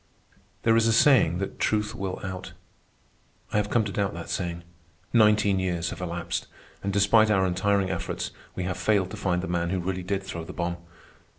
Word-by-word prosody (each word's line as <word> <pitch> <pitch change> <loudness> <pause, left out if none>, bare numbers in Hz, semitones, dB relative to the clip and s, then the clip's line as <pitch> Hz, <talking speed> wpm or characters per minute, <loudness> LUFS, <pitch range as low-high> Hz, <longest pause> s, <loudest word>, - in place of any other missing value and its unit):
There 115 0 +4
is 115 0 +4
a 115 - +3
saying 115 - +5
that 100 +1 -4
truth 105 0 +1
will 95 -4 -4
out. 95 -1 -6 1.0
I - - +2
have 105 0 +1
come 115 0 +3
to 105 - -4
doubt 100 +1 -1
that - - -6
saying. 85 -3 -3 0.5
Nineteen 105 -3 +4
years 90 -2 -1
have - - -7
elapsed, 85 -1 -3 0.3
and 100 - -2
despite 105 +2 +4
our 95 -3 +3
untiring 95 +1 +1
efforts, 90 - -3 0.2
we 90 - -3
have 90 0 -2
failed 100 -4 +2
to - - -5
find 90 -3 0
the - - -3
man 85 0 -1
who 95 - 0
really 95 +1 -2
did 95 +2 -2
throw 85 -3 -6
the 85 +3 -8
bomb. 85 0 -2
95 Hz, 195 wpm, -26 LUFS, 90-105 Hz, 1.0 s, saying